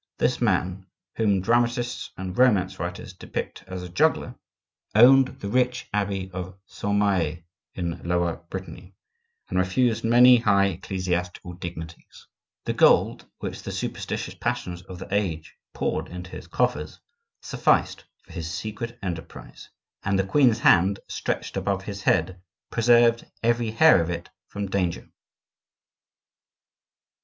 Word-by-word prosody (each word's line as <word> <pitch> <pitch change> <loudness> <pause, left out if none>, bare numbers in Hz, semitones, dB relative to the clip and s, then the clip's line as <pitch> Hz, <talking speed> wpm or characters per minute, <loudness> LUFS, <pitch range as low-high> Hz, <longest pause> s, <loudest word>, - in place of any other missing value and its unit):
This 125 0 0
man, 95 -3 0 0.3
whom 100 -4 +2
dramatists 120 +3 0
and 95 -1 -5
romance 95 -7 +3
writers 90 +2 -5
depict 95 - -6
as 95 -1 -6
a - - -6
juggler, 85 - +1 0.6
owned 130 +4 +7
the 100 - -5
rich 125 +3 0
abbey 100 -2 -2
of 95 0 -6
Saint 100 +1 -2
Mahe 90 -5 +1 0.3
in 85 -2 -4
Lower 85 -1 0
Brittany, 95 0 -8 0.5
and - - -1
refused 115 +5 +1
many 120 +2 +7
high 100 -4 +3
ecclesiastical 90 -1 -3
dignities; 85 -2 -9 0.4
the - - -1
gold - - +3
which - - -6
the - - -6
superstitious - - -4
passions 120 -8 -3
of 90 0 -10
the 90 - -8
age 80 -7 -1 0.2
poured - - -2
into 90 +1 -9
his - - -9
coffers 75 +1 -1 0.4
sufficed - - +1 0.2
for - - -18
his 85 -1 -5
secret 110 +8 -5
enterprise; 85 -4 -7 0.3
and 95 0 +1
the 95 - +1
queen's 120 +2 +4
hand, 95 +3 +4
stretched - - -3
above 100 -1 -1
his 100 -1 -6
head, 90 0 +1 0.3
preserved 120 0 +4 0.2
every 120 0 +1
hair 135 - +6
of 85 - -3
it 85 - -5 0.2
from 100 0 -4
danger. 95 -3 -2
95 Hz, 130 wpm, -25 LUFS, 90-115 Hz, 0.6 s, owned